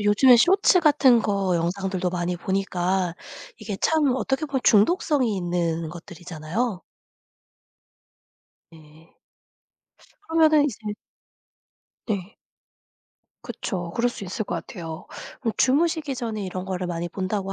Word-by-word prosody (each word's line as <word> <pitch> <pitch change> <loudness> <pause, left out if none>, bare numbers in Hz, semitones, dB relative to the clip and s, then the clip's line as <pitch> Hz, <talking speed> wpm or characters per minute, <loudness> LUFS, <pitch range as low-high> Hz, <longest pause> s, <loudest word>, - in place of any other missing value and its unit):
요즘에 210 +5 +6
쇼츠 365 - +4
같은 285 -6 +5
거 200 -4 0
영상들도 185 +2 -1
많이 175 0 -2
보니까 185 -1 -1 0.4
이게 215 -3 -5
참 300 -5 +2
어떻게 270 +3 -1
보면 275 -3 -2
중독성이 245 - +3
있는 170 -2 -1
것들이잖아요. 175 +4 -5 1.9
네. 160 +1 -18 1.2
그러면은 315 -2 +4
이제 270 -8 -2 1.3
네. 200 -2 -4 1.1
그쵸. 175 -4 -5
그럴 240 +1 +2
수 240 - -7
있을 195 +4 -4
것 175 - -4
같아요. 165 0 -7 0.3
그럼 230 -4 -1
주무시기 305 +1 +1
전에 225 -4 -4
이런 185 0 -5
거를 185 -1 -3
많이 175 0 -3
본다고 195 +2 -3
195 Hz, 250 characters per minute, -24 LUFS, 175-255 Hz, 1.9 s, 요즘에